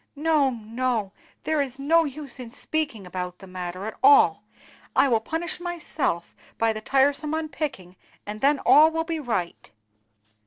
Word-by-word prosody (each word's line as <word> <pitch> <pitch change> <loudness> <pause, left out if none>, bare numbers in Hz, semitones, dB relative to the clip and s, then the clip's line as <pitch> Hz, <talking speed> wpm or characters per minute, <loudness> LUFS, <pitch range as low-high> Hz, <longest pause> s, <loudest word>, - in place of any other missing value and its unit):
No, 300 -2 +2
no, 230 -3 -2 0.3
there 315 -2 +1
is 265 -2 -4
no 320 +4 +3
use 280 -2 -7
in 245 -2 -7
speaking 265 -5 -3
about 180 0 -5
the 190 - -13
matter 185 0 -6
at 220 - -4
all; 430 +2 +6 0.5
I - - +5
will 230 -4 +3
punish 325 +10 -4
myself 320 - -3 0.2
by 225 -1 +2
the 215 - -6
tiresome 280 +5 +1
unpicking, 280 - -5 0.3
and 210 +1 -7
then 285 +1 +4
all 310 +2 +7
will 325 0 -1
be 325 -1 -3
right." 225 - -3
270 Hz, 155 wpm, -25 LUFS, 215-315 Hz, 0.5 s, all